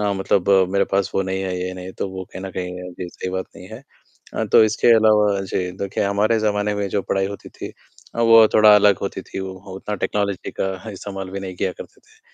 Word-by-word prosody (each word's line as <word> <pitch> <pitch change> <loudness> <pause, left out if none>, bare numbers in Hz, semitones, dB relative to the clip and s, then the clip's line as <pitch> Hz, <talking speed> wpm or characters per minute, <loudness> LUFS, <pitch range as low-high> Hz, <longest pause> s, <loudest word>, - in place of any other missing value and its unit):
अ, 105 -1 +1
मतलब 95 0 0 0.2
मेरे 100 0 +3
पास 95 -1 +1
वो 95 - +2
नहीं 95 0 -1
है, 90 -1 -3
ये 95 - -4
नहीं 90 0 -8
है, 95 - -8
तो - - -4
वो 95 0 -6
कहीं 95 - -7
न 95 - -5
कहीं 90 0 -5
जी, 90 0 -7
सही 90 +1 -6
बात 95 0 -3
नहीं 90 - -11
है। 110 +4 -10 0.5
अ, - - -1
तो - - +8
इसके 110 +2 +1
अलावा 105 -2 +3
जी, 95 -1 -3
देखिए 100 0 -2
हमारे 105 +3 +2
जमाने 105 -1 0
में 100 -1 -2
जो 100 0 -1
पढ़ाई 95 +1 0
होती 100 -1 -8
थी - - -9 0.4
अ, 115 - -2
वो 115 -1 +7
थोड़ा 105 -1 +8
अलग 105 -1 +4
होती 95 -1 -4
थी, 95 - -7
वो 95 0 -5 0.2
उतना 105 +2 -4
टेक्नोलॉजी 100 -1 -2
का 95 +3 -3
इस्तेमाल 95 -1 -7
भी 100 0 -5
नहीं 95 -1 -6
किया 95 0 -1
करते - - -12
थे। - - -26
100 Hz, 240 wpm, -21 LUFS, 95-105 Hz, 0.5 s, तो